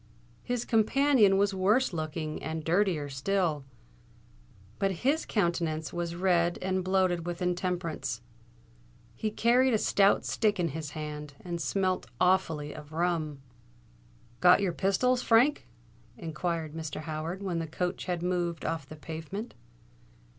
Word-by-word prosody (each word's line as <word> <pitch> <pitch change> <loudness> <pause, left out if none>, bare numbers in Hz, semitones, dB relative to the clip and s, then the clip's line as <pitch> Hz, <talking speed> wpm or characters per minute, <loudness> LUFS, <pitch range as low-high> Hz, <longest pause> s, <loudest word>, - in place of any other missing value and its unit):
His 245 -1 -2
companion 225 -2 +4
was 200 0 +2
worse 200 +6 +2
looking 155 -1 -4
and 160 0 -4
dirtier 170 -3 +1
still; 150 +1 -1 1.1
but 195 0 +2
his 300 +4 +2
countenance 170 -6 -1
was 170 -1 -3
red 175 -1 +2
and 185 0 -1
bloated 185 -2 +1
with 175 -1 -3
intemperance. 175 -8 -2 0.9
He 215 - -2
carried 240 +3 +3
a - - +4
stout 200 -1 +3
stick 210 -3 +1
in 170 -2 +1
his 155 0 -5
hand, 150 -1 -6
and 170 -1 -3
smelt 185 +5 0
awfully 165 -5 +2
of 150 0 -11
rum. 160 -4 -1 1.0
"Got 180 +2 +7
your 195 -4 0
pistols, 245 +8 +2
Frank?" 245 - +3 0.5
inquired 165 -1 -3
Mr. 160 -2 -5
Howard, 160 +4 -4
when 180 -4 -1
the 165 - -3
coach 180 +3 -3
had 175 -2 -2
moved 175 -3 -1
off 160 -4 -3
the 155 - -8
pavement. 165 +8 -6
175 Hz, 130 wpm, -29 LUFS, 160-195 Hz, 1.1 s, Got